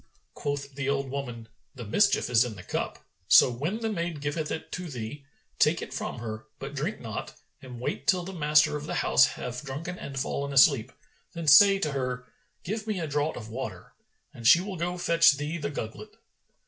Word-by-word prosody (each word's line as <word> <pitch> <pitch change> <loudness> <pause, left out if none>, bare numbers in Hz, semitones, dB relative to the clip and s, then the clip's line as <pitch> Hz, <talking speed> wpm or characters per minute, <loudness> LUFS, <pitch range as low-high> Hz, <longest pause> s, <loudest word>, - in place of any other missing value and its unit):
Quoth 145 -1 -4
the 135 0 -3
old 140 -1 -1
woman, 120 -5 -5 0.3
"The 120 -3 -7
mischief 200 - +2
is 120 -1 +4
in 120 -3 -5
the 90 - -10
cup: - - -4 0.2
so, 125 - +7
when 155 - -3
the 225 -1 -1
maid 170 -5 -3
giveth 150 +2 -3
it 160 - -5
to 180 0 -5
thee, 130 +2 -7 0.3
take 155 +2 +4
it - - -8
from 135 - -4
her, 110 -2 -6
but 135 +1 -7
drink 155 +10 -3
not 110 -3 -6 0.3
and 125 -2 -9
wait 125 +1 -4
till 180 -2 +3
the 190 +2 -7
master 150 -3 +3
of 150 0 -5
the - - -3
house - - +6
have 125 0 -5
drunken 150 +6 -6
and 135 -1 -5
fallen 140 +1 -2
asleep; 135 -2 +5 0.4
then 170 -2 -5
say 195 +7 +8
to 155 -6 -1
her, 125 -2 -3 0.4
'Give 215 +4 -4
me 210 -4 -1
a 165 - -2
draught 145 +1 -1
of 110 -2 -8
water,' 110 -7 -7 0.4
and 115 -1 -2
she 170 - +8
will 190 +1 -5
go 175 +1 -2
to - - -7
fetch 170 -3 +5
thee 150 +4 -4
the 145 -2 -3
gugglet. 110 -6 -7
140 Hz, 205 wpm, -27 LUFS, 125-170 Hz, 0.4 s, say